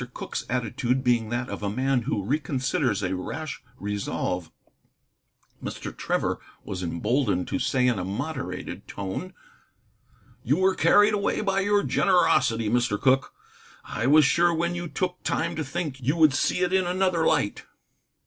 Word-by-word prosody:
Cooke's -, -, -4 dB
attitude 125 Hz, +1 st, -1 dB
being 120 Hz, -3 st, +2 dB
that 120 Hz, +1 st, -2 dB
of -, -, -6 dB
a 100 Hz, -, -1 dB
man 130 Hz, +4 st, +1 dB
who 100 Hz, -9 st, -1 dB
reconsiders 135 Hz, -, 0 dB
a 95 Hz, -, -2 dB
rash 145 Hz, +10 st, -5 dB, 0.2 s
resolve, 100 Hz, -3 st, -3 dB, 1.1 s
Mr. -, -, -6 dB
Trevor -, -, -1 dB, 0.2 s
was 95 Hz, -1 st, -5 dB
emboldened 95 Hz, +3 st, 0 dB
to 140 Hz, -, -1 dB
say 130 Hz, -1 st, +1 dB
in 120 Hz, -5 st, +2 dB
a -, -, -2 dB
moderated 105 Hz, -, -5 dB
tone: 100 Hz, -, -5 dB, 1.1 s
"You 140 Hz, +6 st, +2 dB
were 190 Hz, +1 st, +3 dB
carried 205 Hz, +2 st, +5 dB
away 200 Hz, -1 st, 0 dB
by 195 Hz, -2 st, +1 dB
your 205 Hz, +1 st, +2 dB
generosity, 130 Hz, -, +3 dB
Mr. 120 Hz, -2 st, +1 dB
Cooke. 130 Hz, 0 st, +2 dB, 0.5 s
I 115 Hz, +3 st, -3 dB
was 150 Hz, +1 st, +6 dB
sure 170 Hz, +4 st, +4 dB
when 170 Hz, +1 st, 0 dB
you 175 Hz, 0 st, -4 dB
took 180 Hz, +2 st, -3 dB
time 165 Hz, -, -1 dB
to 160 Hz, -, -2 dB
think 150 Hz, -2 st, -4 dB
you 140 Hz, +6 st, +1 dB
would 155 Hz, -4 st, +5 dB
see 180 Hz, -, +1 dB
it 180 Hz, 0 st, +1 dB
in 190 Hz, -2 st, +2 dB
another 180 Hz, -2 st, +1 dB
light." 100 Hz, -, 0 dB
135 Hz, 155 wpm, -26 LUFS, 110-170 Hz, 1.1 s, was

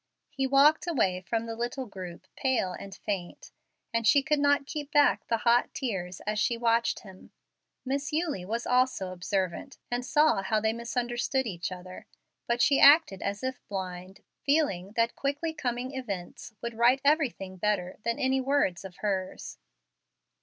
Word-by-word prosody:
He 270 Hz, -1 st, -1 dB
walked 285 Hz, +5 st, +5 dB
away 190 Hz, -, +1 dB
from 225 Hz, +4 st, -2 dB
the 225 Hz, 0 st, -5 dB
little 245 Hz, +3 st, -3 dB
group 185 Hz, -5 st, -9 dB
pale 250 Hz, -9 st, 0 dB
and 195 Hz, +1 st, -9 dB
faint, 195 Hz, -4 st, -4 dB, 0.4 s
and 230 Hz, -1 st, +1 dB
she 280 Hz, +5 st, +5 dB
could 300 Hz, 0 st, +1 dB
not 285 Hz, 0 st, +3 dB
keep 295 Hz, 0 st, -6 dB
back 290 Hz, -1 st, +3 dB
the 230 Hz, -, +1 dB
hot 235 Hz, +2 st, +2 dB
tears 185 Hz, -8 st, -4 dB
as 210 Hz, 0 st, -2 dB
she 235 Hz, +2 st, +1 dB
watched 230 Hz, 0 st, +1 dB
him. 190 Hz, -3 st, -14 dB, 0.6 s
Miss 280 Hz, +3 st, -2 dB
Eulie 305 Hz, -, -1 dB
was 230 Hz, +6 st, -3 dB
also 250 Hz, -7 st, +1 dB
observant, 185 Hz, +6 st, -3 dB
and 245 Hz, +1 st, -1 dB
saw 300 Hz, -4 st, +3 dB
how 215 Hz, +3 st, +1 dB
they 220 Hz, +1 st, +1 dB
misunderstood 240 Hz, +2 st, -1 dB
each 180 Hz, -5 st, -4 dB
other. 185 Hz, 0 st, -9 dB, 0.4 s
But 240 Hz, 0 st, +2 dB
she 280 Hz, -, +4 dB
acted 285 Hz, -, +6 dB
as 200 Hz, +4 st, -3 dB
if 260 Hz, 0 st, -3 dB
blind, 185 Hz, -1 st, -6 dB, 0.2 s
feeling 245 Hz, -, +1 dB
that 230 Hz, +1 st, +1 dB
quickly 290 Hz, +4 st, -2 dB
coming 250 Hz, -2 st, -3 dB
events 200 Hz, -11 st, -6 dB
would 235 Hz, 0 st, -3 dB
right 245 Hz, +3 st, +5 dB
everything 260 Hz, -, +1 dB
better 185 Hz, -2 st, -1 dB
than 235 Hz, 0 st, -1 dB
any 265 Hz, 0 st, +1 dB
words 260 Hz, -10 st, +1 dB
of 190 Hz, -2 st, -9 dB
hers. 190 Hz, -2 st, -3 dB
235 Hz, 160 wpm, -28 LUFS, 195-270 Hz, 0.6 s, acted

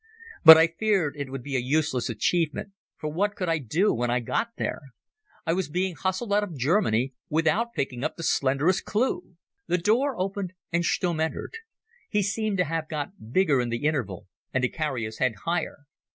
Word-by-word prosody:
But 160 Hz, -1 st, +12 dB
I 160 Hz, -, +6 dB
feared 170 Hz, -3 st, 0 dB
it 145 Hz, -2 st, -5 dB
would 135 Hz, -2 st, -6 dB
be 140 Hz, 0 st, -4 dB
a -, -, +3 dB
useless 135 Hz, 0 st, 0 dB
achievement, 160 Hz, -, 0 dB, 0.3 s
for 155 Hz, -, -4 dB
what 205 Hz, +5 st, 0 dB
could 185 Hz, -, -3 dB
I 165 Hz, -1 st, +1 dB
do 160 Hz, -, +1 dB
when 120 Hz, +1 st, -1 dB
I 120 Hz, +1 st, +2 dB
got 120 Hz, -, -1 dB
there? -, -, -3 dB, 0.6 s
I 165 Hz, -, +1 dB
was 185 Hz, -3 st, -1 dB
being 180 Hz, +3 st, -1 dB
hustled 190 Hz, +5 st, -2 dB
out 210 Hz, +1 st, +3 dB
of 175 Hz, -7 st, -6 dB
Germany 135 Hz, -, +1 dB, 0.2 s
without 165 Hz, +10 st, +1 dB
picking 130 Hz, -2 st, -3 dB
up 155 Hz, -, -2 dB
the 165 Hz, -, -7 dB
slenderest 140 Hz, +7 st, +2 dB
clue. 255 Hz, -, -1 dB, 0.3 s
The 180 Hz, -, +2 dB
door 230 Hz, +7 st, +1 dB
opened 190 Hz, -1 st, -3 dB, 0.2 s
and 170 Hz, 0 st, +1 dB
Stumm 170 Hz, -1 st, 0 dB
entered. 160 Hz, -, -3 dB, 0.5 s
He 210 Hz, -1 st, +1 dB
seemed 210 Hz, 0 st, -1 dB
to 180 Hz, -, +2 dB
have 160 Hz, 0 st, -3 dB
got 145 Hz, -, -6 dB
bigger 150 Hz, -5 st, +3 dB
in 120 Hz, -, -2 dB
the 115 Hz, +4 st, -3 dB
interval 125 Hz, -, -1 dB, 0.3 s
and 130 Hz, -, 0 dB
to 125 Hz, -, +2 dB
carry 150 Hz, -7 st, -2 dB
his 110 Hz, 0 st, -8 dB
head 130 Hz, -3 st, +1 dB
higher. 170 Hz, -3 st, -2 dB
160 Hz, 195 wpm, -26 LUFS, 135-190 Hz, 0.6 s, But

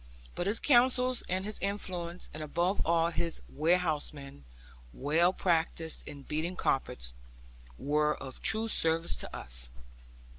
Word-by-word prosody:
But 175 Hz, -, -2 dB
his 210 Hz, +3 st, +1 dB
counsels, 255 Hz, -1 st, +4 dB
and 185 Hz, +2 st, -1 dB
his 215 Hz, 0 st, -3 dB
influence, 180 Hz, -3 st, -4 dB
and 155 Hz, -, -6 dB
above 175 Hz, +6 st, 0 dB
all 165 Hz, 0 st, +2 dB
his 170 Hz, 0 st, -2 dB
warehousemen, 150 Hz, -, -1 dB, 0.5 s
well 160 Hz, +6 st, +3 dB
practised 165 Hz, -3 st, -1 dB
in 145 Hz, -2 st, -8 dB
beating 160 Hz, +6 st, -2 dB
carpets, 60 Hz, -, 0 dB, 0.6 s
were 150 Hz, -, +1 dB
of 135 Hz, -1 st, -9 dB
true 220 Hz, +2 st, +2 dB
service 165 Hz, -5 st, +4 dB
to -, -, -7 dB
us. -, -, -2 dB
165 Hz, 125 wpm, -31 LUFS, 150-185 Hz, 0.6 s, counsels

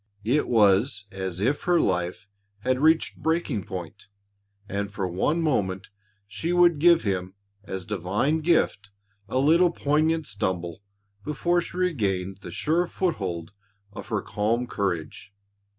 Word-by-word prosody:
It 135 Hz, +7 st, +2 dB
was 105 Hz, -2 st, +3 dB
as 95 Hz, -2 st, -4 dB
if 125 Hz, +8 st, 0 dB
her 175 Hz, -1 st, +4 dB
life 90 Hz, +1 st, -1 dB, 0.3 s
had 130 Hz, +3 st, 0 dB
reached 160 Hz, +2 st, +3 dB
breaking 160 Hz, -, -1 dB
point 95 Hz, +2 st, -8 dB, 0.6 s
and 100 Hz, +1 st, -3 dB
for 100 Hz, -2 st, -2 dB
one 145 Hz, -, 0 dB
moment 95 Hz, -11 st, -1 dB, 0.4 s
she 110 Hz, +12 st, -3 dB
would 175 Hz, -3 st, +5 dB
give 170 Hz, +1 st, +5 dB
him 95 Hz, -2 st, -2 dB, 0.3 s
as 95 Hz, -2 st, -5 dB
divine 105 Hz, -, 0 dB
gift 155 Hz, -10 st, +1 dB, 0.4 s
a -, -, -1 dB
little 165 Hz, +6 st, +5 dB
poignant 155 Hz, 0 st, +1 dB
stumble 95 Hz, -5 st, -3 dB, 0.4 s
before 175 Hz, +6 st, +1 dB
she 175 Hz, -, -8 dB
regained 100 Hz, -, -1 dB
the -, -, -8 dB
sure 170 Hz, +3 st, 0 dB
foothold 95 Hz, -, -2 dB, 0.4 s
of -, -, -8 dB
her -, -, -2 dB
calm 115 Hz, +4 st, 0 dB
courage. 95 Hz, -1 st, -4 dB
105 Hz, 135 wpm, -25 LUFS, 95-160 Hz, 0.6 s, would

